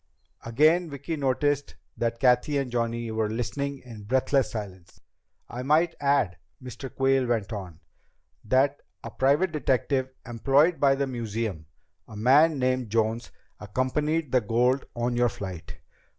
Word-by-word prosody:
Again 155 +9 +3
Vicki 145 +3 -5
noticed 145 0 0 0.2
that 115 0 -2
Cathy 125 +3 +3
and 135 -3 -2
Johnny 115 -1 -2
were 110 -1 -1
listening 135 +5 -3
in 115 -4 -10
breathless 130 +2 +1
silence. 100 -5 -8 0.5
"I 120 - -6
might 155 +5 +2
add," 140 -11 +1 0.2
Mr. 130 +1 -8
Quayle 135 -1 +1
went 115 -2 -1
on, 90 -6 -7 0.6
"that 135 +5 +2 0.2
a - - -7
private 145 +7 +2
detective 130 -2 0 0.2
employed 135 +8 +2
by 135 -1 +4
the 140 0 0
museum, 110 - -4 0.4
a 110 - -11
man 145 +8 +4
named 130 -2 0
Jones, 115 +1 0 0.3
accompanied 135 +7 -1
the 125 - +3
gold 125 +5 +1
on 120 +1 -1
your 120 0 +3
flight. 95 -5 -8
125 Hz, 135 wpm, -26 LUFS, 115-140 Hz, 0.6 s, by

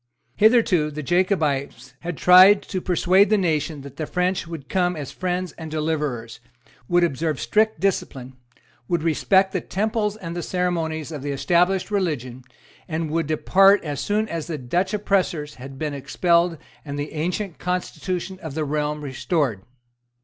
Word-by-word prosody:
Hitherto 210 -8 +4
the 150 0 -6
Jacobites 145 - 0
had 175 -2 -5
tried 185 +3 +7
to 185 - -4
persuade 185 +3 +3
the 215 - +4
nation 155 -5 -1
that 140 0 -11
the 155 - -3
French 180 -1 -1
would 160 -5 -8
come 180 -1 0
as 145 -4 -6
friends 180 -1 -3
and 160 -1 -6
deliverers, 150 -8 -3 0.5
would 175 +4 +3
observe 155 -3 -1
strict 215 - +1
discipline, 135 -9 -2 0.5
would 170 -3 0
respect 190 +4 +3
the 185 - -1
temples 215 +1 -1
and 170 -4 -7
the 175 - -3
ceremonies 165 -4 -2
of 150 -3 -6
the 145 - -4
established 180 +7 +1
religion, 135 - -2 0.4
and 160 -2 -3
would 165 -1 0
depart 195 +6 +4
as 145 -3 -4
soon 215 +1 0
as 165 -5 -4
the 165 -3 -3
Dutch 170 +9 -1
oppressors 185 -7 0
had 135 +1 -9
been 150 0 -3
expelled 170 +5 +1 0.3
and 145 -2 -6
the 145 +1 -4
ancient 175 +4 -3
constitution 180 +1 -3
of 155 -4 -7
the 155 -1 -1
realm 150 +1 -2
restored. 135 - -1
165 Hz, 155 wpm, -23 LUFS, 150-185 Hz, 0.5 s, tried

